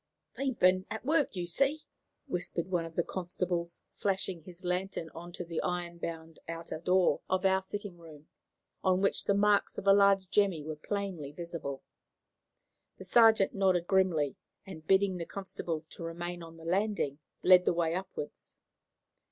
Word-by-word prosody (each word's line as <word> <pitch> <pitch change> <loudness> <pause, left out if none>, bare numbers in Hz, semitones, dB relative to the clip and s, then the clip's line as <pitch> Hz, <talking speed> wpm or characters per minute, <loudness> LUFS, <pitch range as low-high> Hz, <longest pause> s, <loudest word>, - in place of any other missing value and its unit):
"They've 270 -3 -2
been 185 +1 +4
at 220 - -5
work, 300 -5 +2
you 180 -1 -2
see," 275 - +1 0.4
whispered 175 - -2
one 175 -2 +1
of 165 -1 -10
the 175 - +2
constables, 175 -1 -3
flashing 190 -3 0
his 180 +2 -13
lantern 180 -2 -2
on 175 +1 -9
to 180 - -5
the 165 -1 -3
iron 175 -1 -3
bound 165 -1 -6
outer 165 -1 -5
door 180 +2 +3
of 185 +1 +1
our 190 0 +4
sitting 195 -2 -7
room, 155 -3 -14 0.6
on 185 0 +3
which 200 - +1
the 200 - +3
marks 205 0 +3
of - - -5
a 195 - +7
large 200 -1 +5
jemmy 195 -7 +2
were 155 +1 -5
plainly 180 -3 -4
visible. 155 -4 -6 1.1
The - - -10
sergeant 225 -4 +5
nodded 185 -3 +2
grimly, 180 -7 +2 0.3
and, 160 -5 -10
bidding 190 -1 +3
the 170 - -4
constables 170 -5 -5
to - - -11
remain 175 +1 -5
on 165 0 -11
the 165 - -12
landing, 185 -5 0 0.2
led 180 -1 +7
the - - +3
way 165 -1 +1
upwards. 185 -4 -6
180 Hz, 165 wpm, -31 LUFS, 165-195 Hz, 1.1 s, a